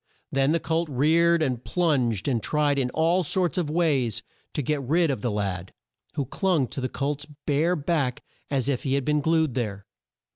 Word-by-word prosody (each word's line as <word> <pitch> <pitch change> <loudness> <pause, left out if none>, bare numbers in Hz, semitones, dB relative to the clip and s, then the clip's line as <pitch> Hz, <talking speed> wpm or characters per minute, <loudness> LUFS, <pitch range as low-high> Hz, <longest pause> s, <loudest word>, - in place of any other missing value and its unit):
Then 135 +1 +2
the 165 - +2
colt 165 0 -1
reared 160 +5 +3
and 125 -4 -1
plunged 130 - +1
and 120 -5 +1
tried 145 +2 +1
in 125 -2 0
all 165 +6 +2
sorts 180 +1 0
of 165 -4 -1
ways 145 - +1 0.3
to 145 - -1
get 150 +2 0
rid 160 +4 +2
of 130 - -3
the 120 - 0
lad, 95 -4 -3 0.4
who 140 - -1
clung 170 -2 +1
to 135 - -5
the 130 - -1
colt's 140 +1 -3 0.2
bare 155 +5 +2
back 145 -5 -1 0.3
as 135 -3 0
if 135 -3 0
he 135 -1 0
had 140 -2 -1
been 150 0 +2
glued 160 -3 +2
there. 100 -5 -3
145 Hz, 190 wpm, -25 LUFS, 125-160 Hz, 0.4 s, reared